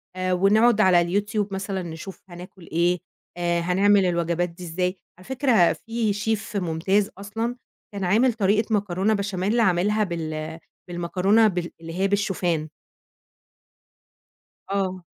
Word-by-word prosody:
آآ 185 Hz, 0 st, -1 dB
ونقعُد 215 Hz, +4 st, +4 dB
على 180 Hz, -3 st, +5 dB, 0.2 s
الYouTube 210 Hz, -1 st, -2 dB
مثلًا 195 Hz, 0 st, -3 dB
نشوف 170 Hz, +3 st, -8 dB
هناكُل 175 Hz, 0 st, -12 dB
إيه، 175 Hz, +2 st, +2 dB, 0.4 s
آآ 175 Hz, 0 st, 0 dB
هنعمل 195 Hz, +3 st, +3 dB
الوجبات 170 Hz, 0 st, 0 dB
دي 175 Hz, +2 st, -12 dB
إزاي؟" 180 Hz, +2 st, -2 dB, 0.2 s
على 185 Hz, -, -16 dB
فكرة 250 Hz, -9 st, +3 dB
فيه 225 Hz, -2 st, -2 dB
Chef 220 Hz, +1 st, -2 dB
ممتاز 190 Hz, +3 st, 0 dB
أصلًا، 225 Hz, +4 st, -3 dB, 0.4 s
كان 200 Hz, -1 st, -4 dB
عامل 225 Hz, +7 st, +3 dB
طريقة 215 Hz, +1 st, +1 dB
مكرونة 200 Hz, +1 st, 0 dB
بشاميل، 200 Hz, +2 st, -1 dB
عاملها 210 Hz, +1 st, +2 dB
بال 160 Hz, -3 st, -4 dB, 0.3 s
بالمكرونة 185 Hz, +5 st, +2 dB
بال 180 Hz, -3 st, -2 dB
اللي 165 Hz, 0 st, -8 dB
هي 195 Hz, -, +3 dB
بالشوفان. 180 Hz, -6 st, -1 dB, 2.0 s
آه. 185 Hz, -2 st, -2 dB
190 Hz, 125 wpm, -24 LUFS, 175-210 Hz, 2.0 s, على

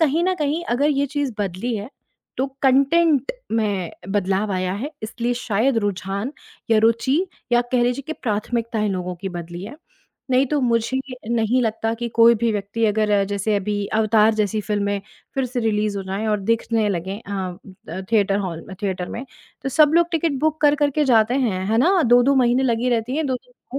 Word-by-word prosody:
कहीं 320 Hz, +2 st, +2 dB
न 370 Hz, 0 st, +2 dB
कहीं 305 Hz, +1 st, -1 dB
अगर 275 Hz, +5 st, +2 dB
ये 280 Hz, 0 st, +1 dB
चीज़ 285 Hz, -2 st, -2 dB
बदली 205 Hz, +4 st, -2 dB
है 205 Hz, +1 st, -6 dB, 0.5 s
तो 265 Hz, -, 0 dB, 0.2 s
कॉन्टेन्ट 280 Hz, -, +3 dB, 0.2 s
में 205 Hz, -6 st, 0 dB, 0.2 s
बदलाव 195 Hz, +1 st, 0 dB
आया 185 Hz, 0 st, -1 dB
है 265 Hz, +9 st, -4 dB
इसलिए 235 Hz, +2 st, -2 dB
शायद 235 Hz, +1 st, +1 dB
रुझान 200 Hz, +3 st, -3 dB, 0.4 s
या 225 Hz, -, +5 dB
रुचि 230 Hz, +3 st, +3 dB, 0.4 s
या 240 Hz, -, +5 dB
कह 245 Hz, -, +3 dB
लीजिए 245 Hz, +3 st, 0 dB
कि 315 Hz, -, -3 dB
प्राथमिकताएँ 225 Hz, -2 st, -2 dB
लोगों 180 Hz, -2 st, -3 dB
की 195 Hz, +2 st, -5 dB
बदली 175 Hz, 0 st, -7 dB
हैं, 225 Hz, +8 st, -8 dB, 0.6 s
नहीं 260 Hz, +2 st, +4 dB
तो 295 Hz, +1 st, 0 dB
मुझे 235 Hz, +1 st, +1 dB, 0.3 s
नहीं 235 Hz, +2 st, +2 dB
लगता 225 Hz, 0 st, -1 dB
कि 235 Hz, +1 st, -4 dB
कोई 230 Hz, +1 st, +6 dB
भी 230 Hz, +1 st, 0 dB
व्यक्ति 205 Hz, +2 st, -2 dB
अगर 210 Hz, -1 st, +2 dB
जैसे 205 Hz, +1 st, -1 dB
अभी 205 Hz, 0 st, -2 dB
अवतार 220 Hz, 0 st, +4 dB
जैसी 215 Hz, 0 st, 0 dB
फ़िल्में, 205 Hz, -1 st, -1 dB, 0.3 s
फिर 270 Hz, -, 0 dB
से 245 Hz, 0 st, -3 dB
रिलीज़ 210 Hz, -2 st, 0 dB
हो -, -, -4 dB
जाए 195 Hz, +3 st, -3 dB
और 210 Hz, -2 st, +1 dB
दिखने 225 Hz, +1 st, +1 dB
लगे 190 Hz, +1 st, -3 dB
अ 205 Hz, -, -9 dB, 0.6 s
अ, 170 Hz, +4 st, -5 dB
थिएटर 200 Hz, -2 st, +3 dB
हॉल 175 Hz, -5 st, -4 dB
में, 190 Hz, -, -7 dB
थिएटर 185 Hz, -3 st, -2 dB
में 250 Hz, -, -6 dB, 0.4 s
तो 270 Hz, -, -2 dB
सब 300 Hz, +3 st, +4 dB
लोग 340 Hz, +1 st, +4 dB
टिकट 325 Hz, -4 st, 0 dB
बुक 315 Hz, 0 st, 0 dB
कर-कर 290 Hz, -1 st, +3 dB
के 300 Hz, +2 st, +1 dB
जाते 235 Hz, -1 st, +4 dB
हैं, 215 Hz, -9 st, 0 dB
है 225 Hz, +2 st, +1 dB
ना 360 Hz, +6 st, +4 dB
2-2 245 Hz, +2 st, +5 dB
महीने 250 Hz, 0 st, +3 dB
लगी 240 Hz, -1 st, +1 dB
रहती 240 Hz, +4 st, 0 dB
हैं, 315 Hz, -, 0 dB
2-2 255 Hz, 0 st, -6 dB
230 Hz, 190 wpm, -22 LUFS, 205-265 Hz, 0.6 s, कोई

